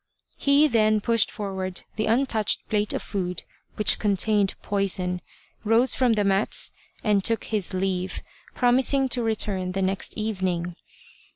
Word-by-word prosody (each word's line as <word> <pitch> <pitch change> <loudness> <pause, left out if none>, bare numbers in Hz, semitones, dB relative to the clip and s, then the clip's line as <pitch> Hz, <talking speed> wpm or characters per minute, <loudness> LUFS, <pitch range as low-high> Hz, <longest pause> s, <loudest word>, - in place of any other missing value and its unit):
He 285 +2 +3
then 215 -4 +2
pushed 230 0 +1
forward 190 -3 -5
the 215 0 -2
untouched 225 -2 +1
plate 210 -1 0
of - - -3
food 180 -4 -4 0.3
which 210 - +4
contained 205 -1 +1
poison, 185 -3 0 0.4
rose 225 +4 +3
from 250 -3 +2
the 210 -2 +1
mats, 195 +1 +1 0.3
and 205 -3 +2
took 230 +1 +1
his 210 -4 -2
leave, 185 -1 -2 0.3
promising 260 +2 +3
to 245 0 +2
return 205 -5 -1
the 195 - -2
next 190 +1 -2
evening. 185 -5 -2
210 Hz, 135 wpm, -24 LUFS, 190-225 Hz, 0.4 s, which